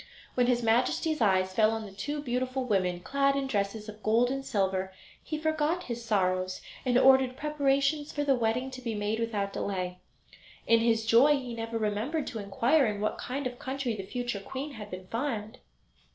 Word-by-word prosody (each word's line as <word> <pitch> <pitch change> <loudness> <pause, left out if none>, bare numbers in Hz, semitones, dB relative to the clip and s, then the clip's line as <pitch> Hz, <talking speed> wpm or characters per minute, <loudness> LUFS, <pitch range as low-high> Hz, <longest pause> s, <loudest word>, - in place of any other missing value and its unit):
When 245 -1 +2
his 245 -1 +2
Majesty's 250 +6 +1
eyes 190 -3 +3
fell 215 +1 +4
on 225 -1 -3
the 200 - -9
two 290 +9 -4
beautiful 255 0 -1
women, 185 -6 0
clad 275 +5 +1
in 275 -1 0
dresses 210 -3 -2
of 215 0 -9
gold 230 +4 +3
and 270 0 -2
silver, 190 -4 0 0.3
he 310 - -4
forgot 315 +3 0
his 235 -1 -5
sorrows 185 -4 0 0.2
and 250 -2 +2
ordered 265 -1 +5
preparations 290 0 +1
for 290 - -1
the 280 -1 +3
wedding 245 +2 0
to 255 0 -8
be 230 -3 -3
made 210 +2 -1
without 205 -4 -2
delay. 180 -2 -3 0.7
In 230 0 +5
his 225 -1 +2
joy 235 +6 +6
he 255 -3 -6
never 230 0 -3
remembered 225 +9 -1
to 225 - -5
inquire 240 +8 +2
in 210 -1 -2
what 215 - -1
kind 275 +2 -4
of 245 -1 -4
country 265 -3 -2
the 200 - -4
future 240 +2 -3
queen 265 +9 -6
had 210 -6 -8
been 185 -1 -7
found. 225 0 -3
235 Hz, 190 wpm, -29 LUFS, 210-270 Hz, 0.7 s, joy